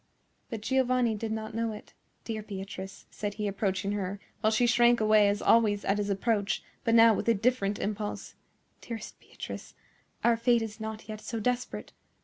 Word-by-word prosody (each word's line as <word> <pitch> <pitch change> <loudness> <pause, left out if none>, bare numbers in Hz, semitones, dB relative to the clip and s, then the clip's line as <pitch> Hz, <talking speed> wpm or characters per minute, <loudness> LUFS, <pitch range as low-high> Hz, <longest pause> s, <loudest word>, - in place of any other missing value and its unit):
But 225 -4 -5
Giovanni 255 -1 +2
did 220 +1 -4
not 220 0 -4
know 225 0 -1
it. 210 - -11 0.3
"Dear 220 -2 -4
Beatrice," 195 -1 -7
said 205 -1 -4
he, 210 -1 -2
approaching 195 0 -1
her, 200 -1 -3 0.2
while 215 - +3
she 220 +3 +3
shrank 240 0 +5
away 215 -1 +5
as 205 0 -1
always 215 -3 +4
at 195 +1 +1
his 205 0 -1
approach, 200 +1 0 0.2
but 230 - +3
now 230 -1 +8
with 225 - -1
a 230 - +5
different 205 -2 +1
impulse, 210 0 -4 0.5
"dearest 230 -2 -7
Beatrice, - - -9 0.5
our 235 -1 +4
fate 235 0 +3
is 220 0 -7
not 220 0 -6
yet 215 -1 -6
so 230 - -4
desperate. 250 +3 -2
220 Hz, 175 wpm, -29 LUFS, 205-230 Hz, 0.5 s, now